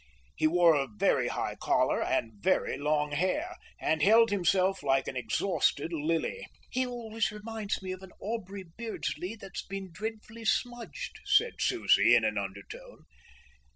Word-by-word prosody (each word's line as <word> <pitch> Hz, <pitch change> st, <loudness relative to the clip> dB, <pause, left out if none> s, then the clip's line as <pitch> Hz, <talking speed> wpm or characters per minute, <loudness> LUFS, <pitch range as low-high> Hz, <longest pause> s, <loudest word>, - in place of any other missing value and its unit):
He 155 Hz, -, +2 dB
wore 170 Hz, 0 st, +5 dB
a 140 Hz, -2 st, +1 dB
very 105 Hz, -, +2 dB
high -, -, -2 dB
collar -, -, +2 dB
and 115 Hz, -, 0 dB
very -, -, +1 dB
long 150 Hz, 0 st, 0 dB
hair, 190 Hz, -, -1 dB, 0.2 s
and 155 Hz, 0 st, 0 dB
held 225 Hz, +6 st, +6 dB
himself 195 Hz, 0 st, +2 dB
like 135 Hz, -1 st, +1 dB
an -, -, -4 dB
exhausted 140 Hz, -, 0 dB
lily. 165 Hz, -, -1 dB, 0.2 s
"He 255 Hz, 0 st, 0 dB
always 225 Hz, -3 st, -2 dB
reminds 210 Hz, -1 st, -4 dB
me 185 Hz, -, -4 dB
of 185 Hz, 0 st, -6 dB
an 190 Hz, -1 st, -12 dB
Aubrey 200 Hz, -3 st, -5 dB
Beardsley 210 Hz, +1 st, -5 dB
that's 195 Hz, -4 st, -7 dB
been 195 Hz, -1 st, -7 dB
dreadfully 220 Hz, +4 st, -7 dB
smudged," 245 Hz, -, -2 dB
said 470 Hz, 0 st, +4 dB
Susie 120 Hz, -, +4 dB
in 120 Hz, -, +4 dB
an 110 Hz, -1 st, 0 dB
undertone. 100 Hz, 0 st, -8 dB
190 Hz, 150 wpm, -30 LUFS, 150-225 Hz, 0.2 s, held